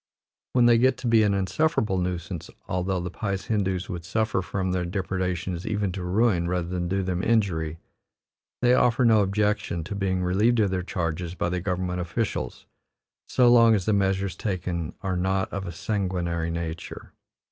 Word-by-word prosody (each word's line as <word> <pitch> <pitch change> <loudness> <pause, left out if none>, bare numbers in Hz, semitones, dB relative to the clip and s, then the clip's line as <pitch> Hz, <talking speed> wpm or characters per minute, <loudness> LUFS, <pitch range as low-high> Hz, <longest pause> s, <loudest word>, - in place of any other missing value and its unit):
When 125 -2 +5
they 120 -1 +6
get 130 0 +3
to 125 -1 -4
be 115 -1 +5
an 105 -2 +3
insufferable 105 - +1
nuisance, 90 -2 -4 0.2
although 90 +1 -1
the 90 0 -4
pious 100 0 -3
Hindoos 95 -4 -1
would 85 -2 -5
suffer 110 +2 0
from 95 +1 -2
their 90 -1 0
depredations 90 -1 -2
even 105 -3 0
to 95 0 -5
ruin 90 -1 +2
rather 90 -1 -1
than 90 -1 -2
do 95 +2 0
them 90 -1 -1
injury, 90 -8 +1 0.9
they 125 0 +5
offer 125 0 +3
no 110 -2 +5
objections 100 -3 0
to 100 +6 -6
being 95 -2 -1
relieved 105 +7 +2
of 100 -3 +2
their 95 -1 0
charges 90 -1 -3
by 85 - -1
the 90 0 -2
government 90 -1 -2
officials, 85 - -3 0.6
so 125 -1 +4
long 115 -2 +6
as 95 -4 -1
the 110 - +2
measures 95 -1 +1
taken 90 -5 -3
are 95 -1 -1
not 95 +1 0
of 100 -1 -3
a - - -4
sanguinary 85 -3 -2
nature. 85 0 -6
95 Hz, 175 wpm, -26 LUFS, 90-105 Hz, 0.9 s, they